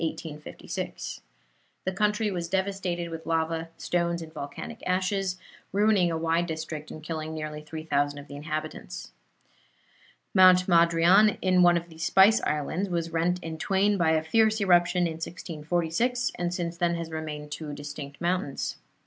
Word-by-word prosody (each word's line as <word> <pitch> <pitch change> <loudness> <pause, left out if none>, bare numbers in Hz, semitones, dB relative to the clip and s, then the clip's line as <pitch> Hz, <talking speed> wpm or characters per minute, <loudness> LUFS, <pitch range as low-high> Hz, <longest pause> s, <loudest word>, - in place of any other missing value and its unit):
The 155 -2 -5 0.8
country 210 +1 +1
was 170 -3 -3
devastated 190 -3 -1
with 165 0 -7
lava, 165 0 0
stones 170 -1 -1
and 160 -1 -12
volcanic 220 +11 -7
ashes, 185 0 0 0.3
ruining 200 -2 +3
a 165 - -1
wide 165 +1 +1
district 160 -1 -5
and 155 - -9
killing 160 0 -4
nearly 155 -1 -5
3,000 145 -2 -1
of 145 0 -9
the 145 - -9
inhabitants. 150 - -5 1.2
Mount 185 -1 +7
Madrian 170 +4 +5
in 185 -1 +3
one 175 -1 +6
of 170 0 -5
the 160 -1 -14
Spice 195 +6 +5
Islands, 160 +6 -1
was 170 -2 -2
rent 180 +2 0
in 160 -1 -6
twain 200 +2 +2
by 160 -2 +3
a 155 -1 +1
fierce 220 +5 +3
eruption 180 -2 +4
in 160 -1 -3
1646, 175 +9 -1
and 175 0 -2
since 170 -1 -3
then 170 -1 +1
has 165 -1 -5
remained 150 -2 -5
two 150 0 -5
distinct 145 0 -7
mountains. 175 -5 -1
170 Hz, 150 wpm, -27 LUFS, 160-185 Hz, 1.2 s, Mount